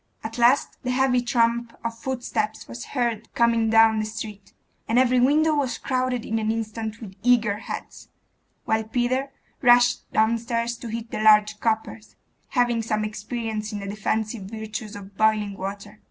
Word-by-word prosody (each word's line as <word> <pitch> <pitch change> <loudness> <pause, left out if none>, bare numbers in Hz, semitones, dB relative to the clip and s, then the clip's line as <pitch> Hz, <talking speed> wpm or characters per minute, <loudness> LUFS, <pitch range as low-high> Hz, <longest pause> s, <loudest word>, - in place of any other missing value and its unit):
At 225 +2 -6
last 245 +4 +3
the 250 - -4
heavy 250 -1 +2
tramp 235 -1 0
of 230 0 -3
footsteps 230 -3 -3
was 115 +1 -7
heard 235 -4 -2
coming 230 -1 +3
down 225 0 +5
the 215 - -1
street, 215 -2 -8 0.4
and 230 - +1
every 255 0 +4
window 305 +5 +4
was 270 -6 0
crowded 255 -2 -1
in 225 0 -1
an 220 0 0
instant 225 0 -4
with 200 -4 -8
eager 230 -4 +3
heads; 220 - -8 0.6
while 220 0 +1
Peter 250 +4 -1 0.3
rushed 245 -1 +4
downstairs 230 +1 +1
to 235 - -8
heat 230 +1 -5
the - - -3
large 210 -1 +5
coppers, 220 -1 -2 0.3
having 240 -2 +1
some 215 -1 -1
experience 215 0 -4
in 210 - -4
the 200 - -6
defensive 215 +1 -2
virtues 220 +1 -6
of 200 -1 -10
boiling 215 -1 +2
water. 200 +2 -7
225 Hz, 160 wpm, -24 LUFS, 215-240 Hz, 0.6 s, down